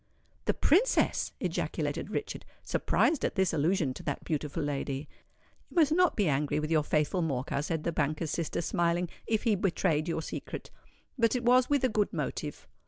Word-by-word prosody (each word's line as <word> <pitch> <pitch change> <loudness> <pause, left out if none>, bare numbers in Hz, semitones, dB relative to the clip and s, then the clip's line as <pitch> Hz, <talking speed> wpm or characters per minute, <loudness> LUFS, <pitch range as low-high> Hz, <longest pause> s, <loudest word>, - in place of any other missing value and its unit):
"The - - +1
Princess!" 405 +11 +3
ejaculated - - -2
Richard, - - -4 0.2
surprised 315 -5 +1
at - - 0
this 190 -3 +2
allusion 160 -2 +1
to - - -9
that 145 - -3
beautiful 155 0 -2
lady. 140 0 -3 0.6
"You - - -17
must 315 -4 +4
not 360 +2 +4
be 205 -4 +2
angry 145 +1 +1
with 155 +1 -3
your 155 -2 +4
faithful 150 +4 +1
Morcar," 140 -3 -1
said 160 +1 -2
the 170 - 0
banker's 155 +1 -1
sister, 165 0 -2
smiling, 170 0 +1 0.2
"if 220 -1 +1
he 225 - +3
betrayed 180 -5 +1
your 165 -1 -2
secret. - - -6 0.5
But 230 +1 +3
it 250 - -1
was 250 +1 +5
with 285 -2 +2
a - - +5
good 210 -2 +1
motive. - - -4
170 Hz, 175 wpm, -30 LUFS, 150-215 Hz, 0.6 s, was